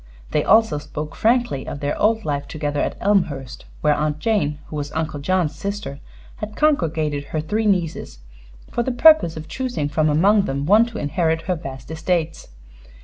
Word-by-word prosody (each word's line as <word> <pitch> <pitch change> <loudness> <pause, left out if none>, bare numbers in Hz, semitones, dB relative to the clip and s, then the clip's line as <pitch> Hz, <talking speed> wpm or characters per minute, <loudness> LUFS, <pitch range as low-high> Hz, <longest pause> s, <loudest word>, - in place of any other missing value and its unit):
They - - +1
also 220 -7 +4
spoke 150 +1 -6
frankly 235 - +1
of 145 - -5
their 145 0 -1
old 220 0 +1
life 145 -1 -2
together 145 -2 -2
at - - -2
Elmhurst, 155 -10 0 0.2
where 150 -1 +3
Aunt 150 0 -1
Jane, 155 -6 0
who - - -9
was 145 -1 -4
Uncle 155 -2 -2
John's 165 +1 0
sister, 195 -4 -5 0.4
had 210 0 -6
congregated 160 - +1
her 155 - -3
three 210 +8 -1
nieces 175 - -1 0.5
for - - 0
the 260 - -1
purpose 275 - +5
of 155 0 -7
choosing 250 - -3
from 155 +1 +1
among 195 +7 +4
them 140 +1 -2
one 215 +7 +5
to 230 -2 -8
inherit 160 +1 0
her 185 - 0
vast 135 -3 -8
estates. 160 0 -2
160 Hz, 175 wpm, -21 LUFS, 150-210 Hz, 0.5 s, purpose